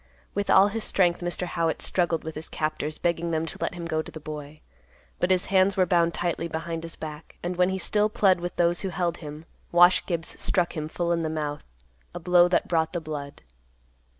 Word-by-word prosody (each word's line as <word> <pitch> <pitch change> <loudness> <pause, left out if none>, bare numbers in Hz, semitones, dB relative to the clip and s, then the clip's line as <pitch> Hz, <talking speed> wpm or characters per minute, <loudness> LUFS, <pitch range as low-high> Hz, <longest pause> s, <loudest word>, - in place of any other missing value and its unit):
With 200 0 -2
all 195 +2 +6
his 225 +1 -3
strength, 175 -3 +2
Mr. 175 +1 -2
Howitt 165 -2 -1
struggled 175 -3 +1
with 160 - -5
his 155 +1 -6
captors, 155 0 -2
begging 170 0 -1
them 160 0 0
to 160 - -5
let - - -2
him 170 -1 -6
go 160 -1 0
to - - -10
the 155 - -8
boy. 150 0 -8 0.6
But 180 - +1
his 185 -1 +2
hands 190 +1 +4
were 185 - +4
bound 170 -1 +2
tightly 170 -1 -1
behind 165 0 -4
his 165 0 -7
back, 155 0 -9
and 175 +1 -2
when 180 +1 +3
he 190 - -1
still 210 +3 +2
plead 195 -4 +3
with 175 0 -5
those 175 0 +2
who 195 - -2
held 175 -2 -1
him, 150 0 -9 0.3
Wash 175 +1 +6
Gibbs 170 -3 -3
struck 180 -2 +1
him 155 -1 -3
full 170 +2 -2
in 170 -1 +1
the 160 - -1
mouth, 150 -2 -3 0.5
a - - -4
blow 175 0 +5
that 180 - +1
brought 160 -1 +1
the 175 - -1
blood. 150 -3 -7
170 Hz, 220 wpm, -26 LUFS, 160-180 Hz, 0.6 s, all